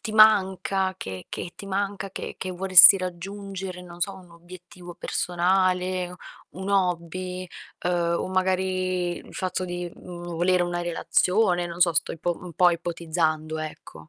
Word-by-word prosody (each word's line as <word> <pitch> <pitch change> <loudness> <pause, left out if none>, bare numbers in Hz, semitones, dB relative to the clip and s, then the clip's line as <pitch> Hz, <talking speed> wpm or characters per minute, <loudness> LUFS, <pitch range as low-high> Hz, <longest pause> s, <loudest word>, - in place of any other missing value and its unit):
ti 215 - -5
manca, 195 -3 +4
che 95 - -7
che 175 - -6
ti 200 - -9
manca, 195 0 -3
che - - -7
che 185 - -4
vorresti 185 +1 +9
raggiungere, 190 0 -6
non 175 -1 -13
so, 195 +3 -1
un 185 -2 -15
obiettivo 175 +1 -13
personale, 180 +1 0 0.3
un 190 +2 -7
hobby, 185 -1 -1 0.4
uhm, 175 -1 +1
o - - -4
magari 185 -1 -1
il - - -13
fatto 185 0 -2
di, 175 -1 -5
mhmm, 175 -1 -8
volere 180 +1 +2
una 175 0 -2
relazione, 175 +2 +1
non 170 0 -8
so, 175 -1 +5
sto 165 - 0
ipo 170 +1 -3
un 180 -1 -9
po' 175 +2 +4
ipotizzando, 165 -2 -2
ecco. 150 - -9
180 Hz, 150 wpm, -25 LUFS, 175-185 Hz, 0.4 s, vorresti